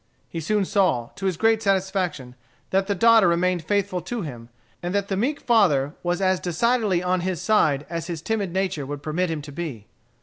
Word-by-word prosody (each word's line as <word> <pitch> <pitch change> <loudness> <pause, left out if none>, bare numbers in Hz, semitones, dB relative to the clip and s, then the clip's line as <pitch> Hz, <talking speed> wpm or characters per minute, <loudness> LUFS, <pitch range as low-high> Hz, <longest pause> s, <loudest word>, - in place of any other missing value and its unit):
He 165 - -5
soon 205 +5 0
saw, 170 - +1
to 195 - -3
his 185 -4 -1
great 225 +1 +3
satisfaction, 190 - -1 0.4
that 195 0 +1
the 200 - 0
daughter 225 0 +6
remained 175 0 +1
faithful 200 0 0
to 225 +5 -4
him, 120 -6 -8 0.3
and 175 +2 -3
that 200 0 0
the 195 - 0
meek 265 +9 0
father 155 - +3
was 175 +1 -1
as 185 -1 +2
decidedly 200 +1 +1
on 180 0 +1
his 180 -2 -2
side 165 -8 +2
as 165 -1 -4
his 165 -3 -5
timid 210 -5 -1
nature 185 -6 -2
would 145 0 -6
permit 165 +4 -1
him 155 -3 -3
to 145 - -9
be. 140 -9 -6
180 Hz, 200 wpm, -24 LUFS, 160-200 Hz, 0.4 s, daughter